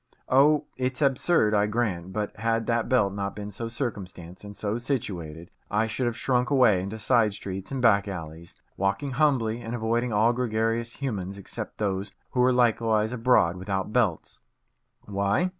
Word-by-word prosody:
Oh, 145 +3 +4
it's 130 0 -1
absurd, 135 -4 +3
I 105 0 +3
grant, 100 -6 -2
but 105 +1 -3
had 115 +1 0
that 115 0 0
belt 100 -7 +3
not 100 0 -3
been 105 0 -6
so 115 +3 -5
circumstanced, 95 -8 -5
and 105 0 -10
so 105 +2 -2
situated, 85 - -4 0.2
I 105 +2 +1
should 115 +3 -2
have 120 -1 -2
shrunk 125 -1 +1
away 120 -9 +4
into 100 +4 -5
side 110 -2 +2
streets 95 -1 -6
and 135 -2 -3
back 100 -3 +4
alleys, 85 -3 -7 0.2
walking 100 +9 -1
humbly 120 -5 +1
and 115 +1 -4
avoiding 120 +1 0
all 110 +3 +3
gregarious 115 -1 -1
humans 100 -8 -4
except 100 - -7
those 100 -1 -2 0.2
who 130 - -2
were 125 +1 +5
likewise 115 -3 +2
abroad 115 -8 +3
without 95 +2 -3
belts. 110 -9 0 0.6
Why? 100 - 0
110 Hz, 165 wpm, -26 LUFS, 100-120 Hz, 0.6 s, were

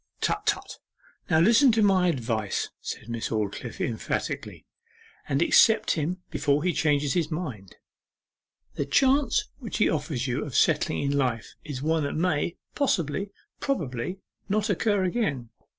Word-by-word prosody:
'Tut, - - -1
tut! - - -1 0.5
Now 160 -2 +4
listen 235 - +6
to 220 -1 +3
my 190 -3 +4
advice,' 115 - -1
said - - -6
Miss 115 -1 -3
Aldclyffe 105 -3 -3
emphatically, - - -4 0.6
'and - - +2
accept 220 -1 +5
him 175 +4 -2
before 145 +1 +1
he 180 -1 +1
changes 145 -3 +1
his 170 -4 0
mind. 135 - -5 1.0
The 145 - -3
chance 265 - +3
which 235 -5 -5
he 210 - +4
offers 145 -5 -2
you 130 +2 -1
of 140 - -7
settling 155 -1 +2
in 140 - 0
life 125 -5 -1
is 140 -3 -6
one 160 +1 +1
that 140 - -2
may 165 0 0 0.2
possibly, 195 - 0 0.3
probably, 165 - -2 0.3
not 210 +1 +1
occur 205 0 +1
again. 175 - -1
160 Hz, 145 wpm, -26 LUFS, 135-195 Hz, 1.0 s, listen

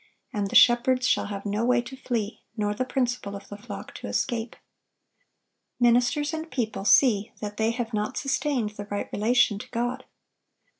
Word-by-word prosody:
and 205 -2 -1
the - - -5
shepherds 250 +1 +5
shall - - +2
have 200 -1 -6
no 205 +2 -1
way 250 +1 +3
to 240 +2 -6
flee, 230 -5 -3 0.2
nor 210 -1 0
the 215 - -1
principal 245 -5 -2
of 200 0 -9
the 205 - -7
flock 205 +4 -9
to - - -7
escape."(1134) 230 -3 -2 1.2
Ministers 245 +5 +3
and 320 +1 -4
people 220 -8 -3
see 210 -3 +4
that 210 -1 -6
they 220 0 +2
have 230 0 -3
not 210 0 -2
sustained 270 -5 0
the 205 -1 -8
right 205 - -4
relation 220 -1 +3
to - - -9
God. 245 +2 -2
235 Hz, 170 wpm, -26 LUFS, 210-250 Hz, 1.2 s, shepherds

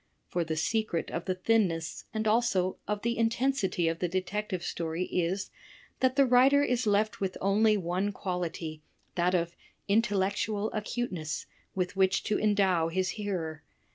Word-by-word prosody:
For 175 - 0
the 160 -1 -3
secret 215 +1 -1
of 165 - -3
the 185 - 0
thinness 185 -5 0
and 220 0 -1
also 210 -5 +2
of 205 0 -2
the 235 0 0
intensity 230 -6 +1
of 165 0 -1
the 180 - 0
detective 185 +1 -2
story 165 0 -2
is 185 +2 -1 0.5
that 260 0 +2
the 275 -1 +5
writer 265 +3 +5
is 250 -4 0
left 210 +1 +1
with 190 -1 -1
only 210 +2 +3
one 185 +2 -1
quality, 175 -5 -4 0.3
that 180 +1 +2
of 170 0 -1 0.3
intellectual 205 0 +1
acuteness, 205 -8 -3 0.3
with 185 0 -1
which 190 0 +2
to 210 - 0
endow 195 -6 +3
his 185 +2 0
hearer. 180 -8 -3
195 Hz, 150 wpm, -29 LUFS, 175-215 Hz, 0.5 s, the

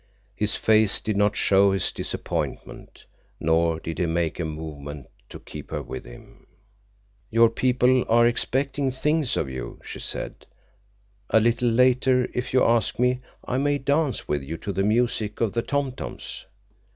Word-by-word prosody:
His 105 0 0
face 110 -2 +3
did 105 0 -2
not 105 +1 +2
show 100 -2 +4
his 95 - 0
disappointment, - - -5 0.3
nor 80 0 +2
did 80 +1 -6
he 90 - +1
make 80 -1 -1
a 85 - -1
movement 75 -3 -7 0.2
to - - -9
keep - - -10
her - - -4
with 65 - -7
him. - - -15 0.8
"Your 115 0 +5
people 125 +1 +3
are 120 +1 +5
expecting 135 +3 0
things 150 +2 0
of 75 - 0
you," 65 -2 -7
she - - -8
said. - - -5 0.8
"A 110 - +5
little 120 +2 +2
later, 125 +1 +3
if 125 +1 -3
you 130 - +4
ask 115 0 +2
me, 125 +1 +1 0.3
I 130 - 0
may 145 +1 +1
dance 140 -1 0
with 75 -1 0
you 75 +5 -6
to 100 - -5
the 95 - 0
music 110 0 0
of 115 -4 0
the 115 - 0
tom 140 +1 -1
toms." 125 - -8
115 Hz, 165 wpm, -24 LUFS, 85-125 Hz, 0.8 s, Your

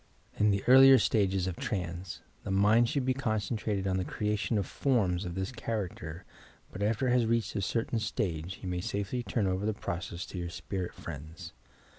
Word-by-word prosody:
In 105 - +5
the 100 -1 +1
earlier 135 +1 +9
stages 95 -5 +2
of 95 -2 -3
trance, 90 -2 -4 0.2
the - - -6
mind 105 +5 +4
should 140 -1 0
be 130 - +2
con 125 -5 0
centrated 105 -1 -2
on 95 -1 +1
the 95 - 0
creation 105 +3 -1
of 100 - 0
forms 100 -9 +1
of 85 -1 -5
this 95 +5 -2
character, 95 -8 -4 0.5
but 95 - -7
after 110 +5 +1
it - - +3
has 120 -2 +3
reached 115 -1 0
a 100 - 0
certain 115 +4 -1
stage, 95 -5 -3
you - - -4
may 90 -1 -2
safely 100 +4 -2
turn 115 -3 -1
over 95 +1 0
the 110 0 0
process 85 -1 -4
to 90 - -7
your 85 -1 -3
spirit 90 +1 -5
friends. 80 +2 -8
100 Hz, 195 wpm, -30 LUFS, 90-115 Hz, 0.5 s, earlier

